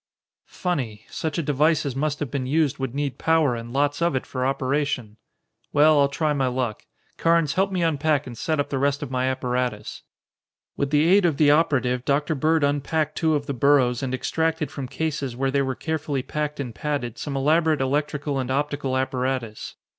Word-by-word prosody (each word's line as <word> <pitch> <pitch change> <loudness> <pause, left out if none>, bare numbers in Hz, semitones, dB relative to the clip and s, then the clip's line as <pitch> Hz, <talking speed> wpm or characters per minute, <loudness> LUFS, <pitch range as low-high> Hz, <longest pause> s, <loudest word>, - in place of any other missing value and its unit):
"Funny! 125 - -3
Such 160 -2 -3
a 170 - 0
device 150 +2 +2
as 135 -3 -3
must 150 +1 -1
have 140 -5 -3
been 130 -2 -2
used 150 -1 +1
would 135 -1 -3
need 140 -2 -2
power 160 -5 +3
and 115 0 -7
lots 145 +3 0
of 170 -4 +2
it 130 - -1
for 130 -1 -3
operation. 135 -5 -1 0.6
Well, 150 +1 +5
I'll 140 - +5
try 150 +2 0
my 135 -2 +1
luck. 125 -3 -3 0.3
Carnes, 165 -3 +2
help 195 +1 +1
me 180 -2 0
unpack 155 -2 +1
and 125 - -8
set 155 +7 -1
up 145 - -1
the 135 - 0
rest 140 +1 +1
of 135 - -6
my 130 0 0
apparatus." 125 -4 -2 0.7
With 140 - -1
the 150 +1 +3
aid 195 +3 +5
of 165 -5 +2
the 145 -2 +5
operative, 130 -5 +2
Dr. 145 +3 +1
Bird 155 +2 +2
unpacked 145 +2 0
two 160 -2 +2
of 145 -1 -2
the 140 - -3
burros 130 -2 +3
and 130 -1 -1
extracted 160 +3 -1
from 135 -3 -5
cases 140 -3 -3
where 135 +1 0
they 140 0 +2
were 130 -1 -1
carefully 150 -4 -2
packed 150 +1 -3
and 125 -4 -4
padded 130 -4 -3
some 140 -2 -3
elaborate 155 +2 +2
electrical 145 +1 -1
and 130 -1 -3
optical 140 -1 -1
apparatus. 130 -4 -2
140 Hz, 195 wpm, -24 LUFS, 130-155 Hz, 0.7 s, Well